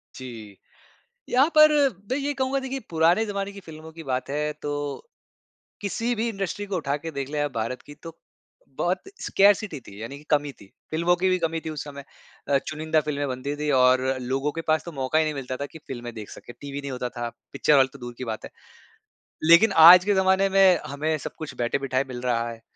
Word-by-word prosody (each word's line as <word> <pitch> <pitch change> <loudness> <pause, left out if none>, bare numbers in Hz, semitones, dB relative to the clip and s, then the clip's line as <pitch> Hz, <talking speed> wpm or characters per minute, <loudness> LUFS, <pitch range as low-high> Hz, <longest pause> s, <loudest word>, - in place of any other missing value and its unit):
जी, 115 -6 -9 0.7
यहाँ 260 +4 +4
पर 305 0 +8 0.4
मैं 260 - +2
ये 290 0 -1
कहूँगा 265 0 0
देखिए 265 0 -4
पुराने 170 +6 +3
ज़माने 200 -1 -3
की 200 - -10
फ़िल्मों 160 -1 -11
की 165 0 -10
बात 130 -2 -3
है 150 +1 -1
तो, 145 - -5 0.7
किसी 230 +4 -1
भी 230 +1 -1
इंडस्ट्री 200 -1 -3
को 195 - -3
उठा 145 -4 -1
के 165 +2 -6
देख 140 -2 -4
लें 150 - -2
आप 145 -2 -2
भारत 115 +3 -3
की 145 - -12
तो, 165 +1 -12 0.6
बहुत 180 +2 0 0.2
स्कार्सिटी 200 -4 +3
थी 100 -2 -13
यानी 135 +5 -6
कि 150 - -17
कमी 145 -1 +2
थी। 100 - -17 0.2
फ़िल्मों 170 +3 +2
की 185 +2 +1
भी 185 0 +2
कमी 165 -1 -1
थी 160 - -3
उस 150 -2 -5
समय 140 -1 -9 0.4
अ, 140 -1 +4
चुनिंदा 155 0 0
फ़िल्में 145 -1 -2
बनती 130 +3 -3
थी 150 0 -2
और 130 0 +5 0.2
लोगों 135 +3 -1
के 165 - -4
पास 155 0 +2
तो 170 - -7
मौका 135 +1 0
ही 160 - +3
नहीं 155 - -2
मिलता 130 -2 -5
था 140 +2 -4
कि 160 - -13
फ़िल्में 120 -2 -6
देख 105 -2 -8
सकें, 120 - -11
टीवी 140 0 -6
नहीं 140 - -6
होता 125 -1 -3
था, 120 -1 -5 0.2
पिक्चर 145 +2 +3
हॉल 135 -1 +6
तो 140 - -12
दूर 120 -1 -8
की 130 - -4
बात 110 -2 -5
है। - - -8 1.0
लेकिन 185 +6 +7 0.2
आज 180 +2 +10
के 205 - +3
जमाने 190 +1 +3
में 190 -2 +5
हमें 155 +3 -1
सब - - -6
कुछ 155 -2 -7
बैठे-बिठाए 130 +2 0
मिल 125 -2 -7
रहा 120 -2 0
है, 115 -1 -9
150 Hz, 220 wpm, -25 LUFS, 130-180 Hz, 1.0 s, आज